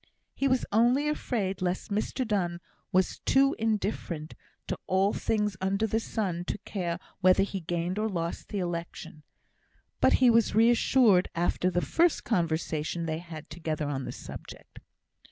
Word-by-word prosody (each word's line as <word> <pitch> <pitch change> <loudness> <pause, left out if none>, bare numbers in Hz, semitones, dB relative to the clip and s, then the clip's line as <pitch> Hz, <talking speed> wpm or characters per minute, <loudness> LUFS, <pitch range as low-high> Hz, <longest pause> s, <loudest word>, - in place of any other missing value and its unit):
He 275 - 0
was 260 -1 +2
only 240 +7 +3
afraid 215 -11 -2
lest 185 +2 -2
Mr 220 +4 -1
Donne 175 -5 0 0.3
was 185 0 +1
too 275 +1 +3
indifferent 200 -8 -2 0.3
to - - -2
all 190 +2 +2
things 210 -2 0
under 195 +3 +1
the 220 +1 0
sun 190 -6 -2
to - - -3
care 175 -4 -2 0.2
whether 185 0 +5
he 195 -1 -3
gained 175 +3 -2
or 220 +1 0
lost 170 -3 -3
the 205 - -3
election; 170 -3 -5 0.8
but - - +4
he 250 -2 +5
was 230 -3 +3
reassured 225 -3 +4
after 175 +1 +1
the 175 0 0
first 335 0 +2
conversation 165 -3 -1
they 160 0 -2
had 165 -3 -9
together 155 -2 -3
on 135 -2 -3
the - - -4
subject. - - -10
190 Hz, 155 wpm, -28 LUFS, 170-220 Hz, 0.8 s, whether